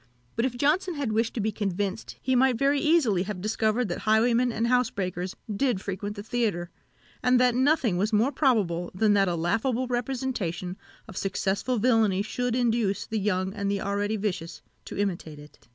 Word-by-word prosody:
But 230 Hz, -, +1 dB
if 245 Hz, -2 st, -2 dB
Johnson 320 Hz, +7 st, +1 dB
had 280 Hz, -6 st, -2 dB
wished 225 Hz, +1 st, 0 dB
to -, -, -2 dB
be 215 Hz, +1 st, 0 dB
convinced, 200 Hz, 0 st, -3 dB
he 260 Hz, 0 st, +1 dB
might 255 Hz, -1 st, +3 dB
very 280 Hz, +3 st, +2 dB
easily 300 Hz, -, +3 dB
have 195 Hz, 0 st, -4 dB
discovered 215 Hz, +3 st, 0 dB
that 175 Hz, -, -3 dB
highwaymen 235 Hz, +3 st, +3 dB
and 225 Hz, 0 st, -1 dB
housebreakers 195 Hz, -7 st, 0 dB, 0.2 s
did 245 Hz, -3 st, +1 dB
frequent 200 Hz, +2 st, -5 dB
the 205 Hz, -, -7 dB
theatre, 210 Hz, -7 st, -1 dB, 0.5 s
and 250 Hz, 0 st, +4 dB
that 250 Hz, -1 st, +4 dB
nothing 260 Hz, -, +2 dB
was 205 Hz, +4 st, 0 dB
more 225 Hz, +6 st, +3 dB
probable 205 Hz, -, +1 dB
than 210 Hz, +2 st, +3 dB
that 195 Hz, -1 st, +3 dB
a 175 Hz, -, 0 dB
laughable 225 Hz, +9 st, 0 dB
representation 240 Hz, -8 st, -3 dB, 0.3 s
of -, -, -10 dB
successful 195 Hz, +5 st, -1 dB
villany 220 Hz, -4 st, +3 dB
should 245 Hz, +3 st, -2 dB
induce 230 Hz, -5 st, +1 dB
the 220 Hz, -, -2 dB
young 190 Hz, -1 st, -1 dB
and 200 Hz, -1 st, -2 dB
the 200 Hz, 0 st, 0 dB
already 205 Hz, +2 st, -1 dB
vicious 180 Hz, -5 st, -4 dB, 0.2 s
to -, -, -7 dB
imitate 175 Hz, -6 st, -2 dB
it. 145 Hz, -5 st, -16 dB
215 Hz, 180 wpm, -27 LUFS, 195-250 Hz, 0.5 s, and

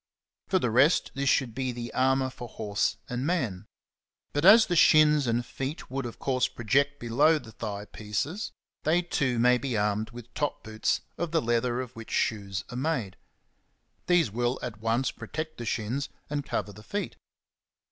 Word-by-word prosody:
For 190 Hz, -, +2 dB
the 125 Hz, -11 st, 0 dB
rest, 135 Hz, +9 st, +4 dB
this 140 Hz, 0 st, 0 dB
should 125 Hz, -4 st, +2 dB
be 130 Hz, +1 st, -2 dB
the 120 Hz, -1 st, -6 dB
armour 130 Hz, 0 st, +2 dB
for 120 Hz, -, -8 dB
horse 105 Hz, -2 st, -1 dB
and 125 Hz, +1 st, -3 dB
man; 120 Hz, -, -1 dB, 0.7 s
but 145 Hz, -, 0 dB
as 220 Hz, +3 st, +9 dB
the 175 Hz, -, -1 dB
shins 150 Hz, -3 st, +6 dB
and 120 Hz, +1 st, 0 dB
feet 135 Hz, +4 st, -5 dB
would 135 Hz, -1 st, -2 dB
of 115 Hz, -, -9 dB
course 130 Hz, -2 st, +1 dB
project 140 Hz, +5 st, +1 dB
below 145 Hz, +7 st, +3 dB
the 115 Hz, -7 st, -10 dB
thigh 105 Hz, -2 st, -5 dB
pieces, 110 Hz, -, -3 dB, 0.3 s
they 170 Hz, +4 st, +2 dB
too 130 Hz, -7 st, 0 dB
may 125 Hz, +1 st, +4 dB
be 130 Hz, -4 st, -2 dB
armed 105 Hz, +1 st, 0 dB
with 120 Hz, 0 st, -11 dB
top 145 Hz, -1 st, -2 dB
boots 110 Hz, 0 st, -1 dB, 0.2 s
7 170 Hz, -, 0 dB
of 165 Hz, -, -12 dB
the 165 Hz, -, +4 dB
leather 120 Hz, +1 st, +1 dB
of 125 Hz, -1 st, -8 dB
which 115 Hz, 0 st, -9 dB
shoes 100 Hz, -3 st, -1 dB
are 120 Hz, -, -5 dB
made. 125 Hz, -, -1 dB, 0.9 s
These 175 Hz, -, +3 dB
will 120 Hz, +3 st, 0 dB
at 110 Hz, -4 st, -5 dB
once 115 Hz, +4 st, +1 dB
protect 155 Hz, -2 st, -6 dB
the 120 Hz, -, -4 dB
shins 120 Hz, +5 st, -2 dB, 0.2 s
and 145 Hz, -1 st, -1 dB
cover 105 Hz, -, -3 dB
the 105 Hz, -, -12 dB
feet. 200 Hz, -, -4 dB
125 Hz, 180 wpm, -28 LUFS, 115-145 Hz, 0.9 s, as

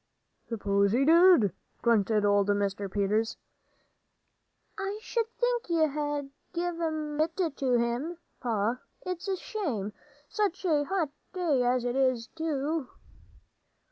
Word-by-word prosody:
"S'pose 200 Hz, -3 st, +1 dB
he 265 Hz, +3 st, +3 dB
did?" 330 Hz, -, +6 dB, 0.3 s
grunted 215 Hz, -2 st, +3 dB
old 205 Hz, -1 st, +3 dB
Mr. 200 Hz, -1 st, 0 dB
Peters. 210 Hz, +3 st, 0 dB, 1.4 s
"I 390 Hz, +1 st, -3 dB
sh'd 455 Hz, +1 st, -2 dB
think 485 Hz, -4 st, 0 dB
you'd 315 Hz, -4 st, +2 dB
'a' 290 Hz, -1 st, -1 dB, 0.3 s
give 345 Hz, 0 st, -2 dB
it 315 Hz, 0 st, -1 dB
to 260 Hz, -2 st, +1 dB
him, 240 Hz, +9 st, -1 dB, 0.2 s
Pa. 230 Hz, 0 st, 0 dB, 0.3 s
It's 365 Hz, +1 st, -4 dB
a 385 Hz, -, +1 dB
shame. 255 Hz, -, -3 dB, 0.3 s
Such 395 Hz, -1 st, -1 dB
a 300 Hz, -4 st, +3 dB
hot 345 Hz, -4 st, -1 dB, 0.2 s
day 335 Hz, -8 st, +1 dB
as 245 Hz, 0 st, +2 dB
'tis, 250 Hz, -1 st, +1 dB
too." 310 Hz, -3 st, -1 dB
285 Hz, 115 wpm, -29 LUFS, 225-340 Hz, 1.4 s, did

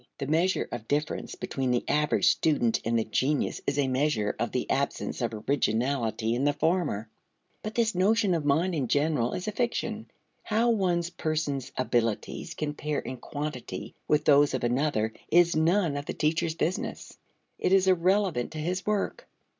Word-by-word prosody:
The 140 Hz, -, -3 dB
measure 165 Hz, +6 st, +1 dB
of 115 Hz, -2 st, -6 dB
difference 150 Hz, +2 st, -2 dB
between 135 Hz, -2 st, -3 dB
the 125 Hz, -1 st, +1 dB
average 150 Hz, 0 st, +2 dB
student 130 Hz, -8 st, +2 dB
and 115 Hz, +1 st, +1 dB
the 115 Hz, -, 0 dB
genius 135 Hz, +6 st, 0 dB
is 140 Hz, -, 0 dB
a 140 Hz, -2 st, +2 dB
measure 130 Hz, -5 st, 0 dB
of 115 Hz, -, -1 dB
the 125 Hz, -, -2 dB
absence 140 Hz, 0 st, -1 dB
of 120 Hz, -1 st, 0 dB, 0.2 s
originality 115 Hz, -3 st, 0 dB
in 125 Hz, +3 st, 0 dB
the 145 Hz, 0 st, +3 dB
former. 155 Hz, -, 0 dB, 0.5 s
But 215 Hz, +1 st, -6 dB
this 230 Hz, -2 st, +2 dB
notion 200 Hz, +2 st, +3 dB
of 165 Hz, -3 st, 0 dB
mind 160 Hz, +6 st, +2 dB
in 140 Hz, -6 st, -1 dB
general 145 Hz, -3 st, +1 dB
is 185 Hz, -, -4 dB
a -, -, 0 dB
fiction. 225 Hz, -1 st, -2 dB, 0.3 s
How 230 Hz, +2 st, +2 dB
one 180 Hz, -6 st, +1 dB, 0.2 s
person's 150 Hz, -4 st, -1 dB
abilities 120 Hz, -, -1 dB
compare 150 Hz, -1 st, -3 dB
in 130 Hz, -, -4 dB
quantity 145 Hz, 0 st, -6 dB
with 150 Hz, 0 st, +2 dB
those 145 Hz, -1 st, +5 dB
of 130 Hz, -, -3 dB
another 120 Hz, -3 st, 0 dB, 0.2 s
is 170 Hz, 0 st, +4 dB
none 165 Hz, 0 st, +2 dB
of 145 Hz, +1 st, -5 dB
the -, -, -4 dB
teacher's 160 Hz, +1 st, 0 dB
business. 170 Hz, +2 st, -3 dB, 0.4 s
It -, -, +1 dB
is 190 Hz, -1 st, +5 dB
irrelevant 185 Hz, -6 st, +2 dB
to -, -, -6 dB
his 180 Hz, +4 st, -2 dB
work. 210 Hz, -2 st, -1 dB
150 Hz, 170 wpm, -28 LUFS, 130-175 Hz, 0.5 s, those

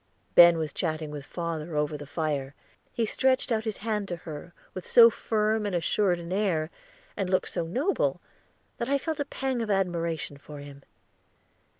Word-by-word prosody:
Ben 170 Hz, -1 st, +9 dB
was 155 Hz, -2 st, -3 dB
chatting 155 Hz, -3 st, -2 dB
with 145 Hz, -1 st, -7 dB
father 170 Hz, -2 st, -4 dB
over 150 Hz, 0 st, 0 dB
the 145 Hz, -1 st, -8 dB
fire; 145 Hz, -3 st, -2 dB, 0.4 s
he 230 Hz, -, 0 dB
stretched 260 Hz, +3 st, +2 dB
out 220 Hz, -1 st, +1 dB
his 220 Hz, -2 st, -2 dB
hand 210 Hz, -3 st, -1 dB
to 175 Hz, -, -3 dB
her, 160 Hz, 0 st, -9 dB, 0.2 s
with 185 Hz, -, -6 dB
so 235 Hz, +4 st, +7 dB
firm 215 Hz, 0 st, 0 dB
and 205 Hz, -3 st, -1 dB
assured 175 Hz, +2 st, +2 dB
an 170 Hz, +1 st, -5 dB
air, 180 Hz, -6 st, 0 dB, 0.4 s
and 190 Hz, -2 st, -2 dB
looked 185 Hz, 0 st, +1 dB
so 165 Hz, -, -2 dB
noble, 280 Hz, -, 0 dB, 0.6 s
that 235 Hz, -, -2 dB
I 280 Hz, -, +3 dB
felt 315 Hz, +2 st, -3 dB
a 285 Hz, -, 0 dB
pang 265 Hz, -3 st, -2 dB
of 225 Hz, -, -3 dB
admiration 170 Hz, -6 st, -1 dB
for 145 Hz, +1 st, -11 dB
him. 140 Hz, -1 st, -10 dB
175 Hz, 180 wpm, -27 LUFS, 155-220 Hz, 0.6 s, Ben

